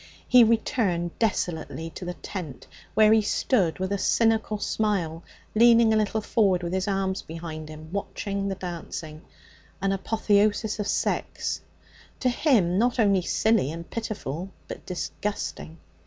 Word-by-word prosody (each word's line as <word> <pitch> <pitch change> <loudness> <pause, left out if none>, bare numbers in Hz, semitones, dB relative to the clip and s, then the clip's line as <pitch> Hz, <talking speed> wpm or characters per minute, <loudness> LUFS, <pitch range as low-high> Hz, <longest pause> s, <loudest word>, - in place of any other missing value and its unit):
He 250 -1 +8
returned 220 -6 +1
desolately 165 -6 -1
to 180 - -8
the 175 0 -4
tent, 175 -11 -7 0.3
where 215 0 +6
he 220 - +5
stood 205 -4 +1
with 190 +1 -3
a 200 - 0
cynical 225 -1 +2
smile, 195 -6 -1 0.3
leaning 230 0 +6
a - - +3
little 215 0 +1
forward 195 -5 +2
with 170 +1 -3
his 190 +1 -1
arms 195 -1 -1
behind 160 -1 -7
him, 155 +2 -10
watching 200 0 -3
the 195 - -2
dancing, 165 -3 -6 0.6
an 195 0 0
apotheosis 210 +1 +1
of 205 - -2
sex, - - -1 0.6
to 255 - +2
him 225 - +2
not 245 +2 +1
only 200 -4 +4
silly 215 - +2
and 170 +1 -8
pitiful, 195 -7 -4 0.2
but - - -9
disgusting. 180 -2 -4
195 Hz, 140 wpm, -26 LUFS, 175-220 Hz, 0.6 s, He